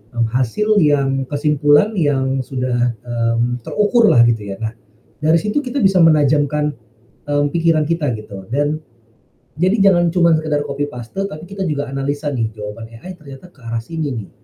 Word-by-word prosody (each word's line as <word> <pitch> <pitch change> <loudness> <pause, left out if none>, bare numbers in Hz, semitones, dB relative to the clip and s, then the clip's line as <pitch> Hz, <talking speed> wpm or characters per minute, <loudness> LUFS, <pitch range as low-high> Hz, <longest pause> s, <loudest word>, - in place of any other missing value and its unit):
mmm, 115 -1 +1
hasil 205 - +1
yang 135 -3 +1
kesimpulan 150 +6 +2
yang 135 -6 0
sudah, 125 -2 -1
mmm, 120 +1 -1
terukurlah 210 - +3
gitu 110 -3 -2
ya. 95 - -5
Nah 110 +1 -3 0.5
dari 160 +2 +4
situ 210 - -1
kita 260 0 -5
bisa 190 -2 +4
menajamkan, 150 -1 +3 0.5
eee, 145 0 +1
pikiran 165 -1 +2
kita 155 -6 0
gitu, 100 -3 -9
dan 145 +2 0 0.8
jadi 195 +3 +4
jangan 175 -2 +3
cuma 170 -3 +4
sekedar 155 -2 -1
copy 140 +1 -2
paste 125 +12 -5
tapi 160 -2 -8
kita 195 -1 -5
juga 145 -3 -2
analisa 140 +2 -3
nih 115 -5 -2
jawaban 110 +2 -8
AI 185 +4 -9
ternyata 140 +2 -12
ke 130 -8 -23
arah 115 0 -3
sini 150 +1 -4
nih, 110 -4 -6
145 Hz, 160 wpm, -18 LUFS, 125-165 Hz, 0.8 s, dari